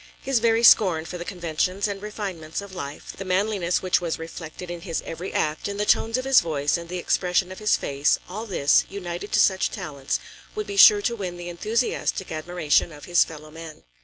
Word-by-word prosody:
His 270 -3 0
very 230 0 +2
scorn 180 -9 +6
for 180 +1 -7
the - - -4
conventions 180 +2 -1
and 200 -1 -5
refinements 195 -7 -5
of 200 -1 -9
life, 140 -5 -7
the - - -6
manliness 190 -1 0
which 185 -1 +2
was 170 -2 -2
reflected 165 +2 -8
in 175 -1 -6
his 165 -2 -3
every 175 +3 -6
act, 155 0 -1
in 200 0 -4
the 210 - 0
tones 225 +3 +2
of 255 - -3
his 270 -1 +6
voice 150 -3 0
and 170 -1 -6
the 180 - -4
expression 180 +1 0
of 185 - -8
his 210 0 +2
face, 140 +1 +1
all 215 +5 -6
this, 150 -7 +3
united 185 0 -6
to - - +4
such 190 -1 +3
talents, 140 -2 -4 0.4
would 425 0 -3
be 405 - -6
sure 410 +1 +8
to 235 - 0
win 185 -5 -5
the 175 0 -7
enthusiastic 215 +1 -1
admiration 160 0 0
of 150 -1 -11
his 175 -1 +4
fellow 155 -1 -11
men. 160 -1 -10
180 Hz, 210 wpm, -24 LUFS, 165-205 Hz, 0.4 s, sure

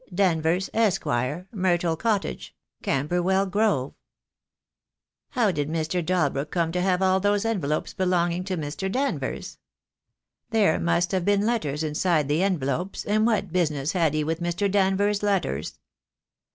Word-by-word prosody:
Danvers, 175 -1 +1
Esq., 215 -4 +1 0.5
Myrtle 175 -4 +1
Cottage, 210 +2 -2 0.3
Camberwell 180 +7 +1
Grove. 195 -9 0 1.4
How 235 -6 +2
did 145 -3 -2
Mr. 165 +2 -1
Dalbrook 150 -5 0
come 165 -1 0
to 180 +1 -1
have 185 0 +1
all 190 0 +3
those 205 +2 +1
envelopes 165 -10 -1
belonging 180 -2 0
to 190 -2 -2
Mr. 160 +5 -3
Danvers? 275 +5 -3 0.9
There 210 -8 +3
must 170 +1 +1
have 190 -2 0
been 205 +2 +2
letters 160 -11 -1
inside 155 0 +1
the 150 +4 +2
envelopes, 180 -1 -1
and 215 +2 +2
what 200 -6 0
business 150 -5 0
had 165 -5 +1
he 155 - +1
with 160 +2 -2
Mr. 175 +4 0
Danvers' 200 +1 +2
letters?" 190 - -1
180 Hz, 135 wpm, -25 LUFS, 160-200 Hz, 1.4 s, all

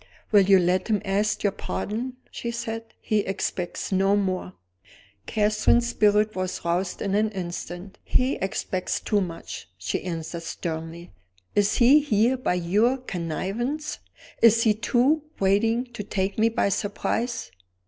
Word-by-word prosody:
"Will 205 -2 +7
you 195 0 +6
let 180 +1 +1
him 215 -3 +2
ask 205 +2 0
your 200 - +3
pardon?" 240 +6 -4 0.2
she 235 - -4
said. 230 -1 -4 0.2
"He 215 - +1
expects 195 -2 -3
no 195 +1 +3
more." 185 -2 -1 0.7
Catherine's 215 +3 +2
spirit 210 -1 +3
was 185 -2 -3
roused 175 +2 -1
in 200 -1 -1
an 215 +2 +2
instant. 175 +1 -6
"He 255 +2 +1
expects 190 -1 -2
too 205 -1 +1
much!" 165 - -6
she 90 - -2
answered, 170 -1 -5
sternly. 165 0 -5 0.4
"Is 205 0 +2
he 260 +5 +7
here 245 -3 +2
by 255 -8 0
your 205 +9 +2
connivance? 235 - -3 0.4
Is 230 0 +6
he, 220 - +4
too, 245 +7 +2 0.2
waiting 225 +5 +2
to 210 - -5
take 195 0 -2
me 225 +1 +4
by 225 - +1
surprise?" 220 - -2
205 Hz, 140 wpm, -25 LUFS, 185-230 Hz, 0.7 s, Will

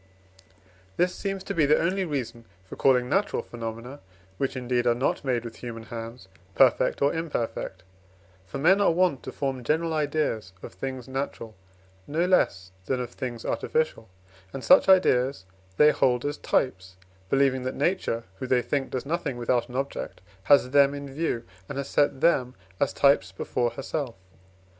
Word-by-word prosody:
This 180 0 +2
seems 195 -1 -4
to - - -4
be 155 -4 +3
the 150 - +5
only 185 +3 0
reason 125 -7 -4 0.2
for - - -9
calling 125 -2 +3
natural 195 +9 0
phenomena, 115 +3 -7 0.4
which, 135 -1 -1
indeed, 125 -1 0
are 120 - +4
not 130 +4 -1
made 125 -3 -1
with 115 - -8
human 115 -2 -7
hands, 115 -2 -8 0.3
perfect - - +3
or 140 - +3
imperfect: 120 - -3 0.6
for 140 - -6
men 185 +8 +4
are 200 - +5
wont 175 -5 +2
to - - -7
form 135 -3 -3
general 160 +5 0
ideas 145 - -1
of - - -8
things 130 +6 -6
natural, 130 -4 -4 0.5
no 165 +4 0
less 95 - +1 0.2
than 130 - 0
of 125 -1 -4
things 120 -3 -6
artificial, 155 -9 -1 0.4
and 135 - -7
such 275 -7 +6
ideas 135 - +4 0.3
they 150 0 +7
hold 125 -3 +1
as 145 +1 -2
types, 95 -7 -1 0.3
believing 135 0 +2
that 130 +1 -4
Nature 140 -7 0 0.2
(who 130 - -4
they 125 -1 +2
think 140 -2 -1
does 130 +1 -4
nothing 150 -4 -2
without 120 0 0
an 125 - -9
object) 135 +1 -4 0.3
has 135 0 +5
them 140 0 +5
in 140 -1 -7
view, 145 -6 -2 0.3
and 140 - -5
has 140 -1 -3
set 145 -2 +1
them 130 -7 +2 0.2
as - - +2
types 140 -10 +3
before 120 +5 -1
herself. 135 +1 -4
135 Hz, 165 wpm, -26 LUFS, 120-150 Hz, 0.6 s, they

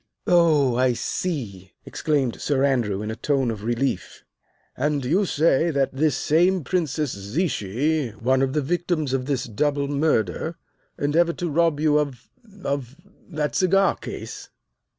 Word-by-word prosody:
"Oh, 155 -8 +4
I 130 -1 +3
see," 110 - -4
exclaimed 140 -6 -1
Sir 140 -2 +1
Andrew 115 -8 +1
in 105 - -3
a - - -4
tone 135 0 0
of 105 -2 -7
relief. 120 +3 -2 0.5
"And 145 0 -1
you 180 +10 +2
say 160 +1 +2
that 140 -4 0
this 145 0 +1
same 175 +5 +2
Princess 155 -4 -1
Zichy, 130 - -1
one 130 +5 +1
of 135 -1 0
the 150 -1 0
victims 165 -2 -1
of 130 -1 -1
this 135 -3 0
double 140 +5 -1
murder, 140 - 0 0.4
endeavored 165 +4 +1
to 175 -3 -2
rob 165 -1 +2
you 150 -1 +3
of 135 -5 -4 0.3
of 140 -2 -3 0.3
that 150 -3 -2
cigar 195 +1 +3
case." - - -8
140 Hz, 145 wpm, -23 LUFS, 125-160 Hz, 0.5 s, Oh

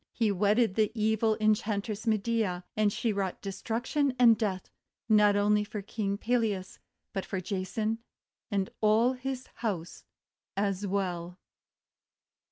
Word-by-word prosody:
He 225 -3 +1
wedded 205 +2 +3
the 215 0 +2
evil 220 0 +2
En 215 0 +5
chantress 210 0 -3
Medea; 215 -4 0
and 215 -1 +3
she 225 +1 -1
wrought 195 -2 -2
destruction 235 +8 -1
and 235 -3 +7
death 200 -4 -2 0.4
not 210 -2 +5
only 210 +1 +3
for 210 -1 -6
King 200 -1 -2
Peleas 215 -5 -1 0.3
but 195 - -2
for 190 - -3
Jason 205 +4 -2 0.5
and 200 -3 -1
all 220 +4 +4
his 260 0 -4
house 185 -7 -4 0.5
as 200 0 0
well. 180 -3 -2
210 Hz, 130 wpm, -29 LUFS, 195-225 Hz, 0.5 s, and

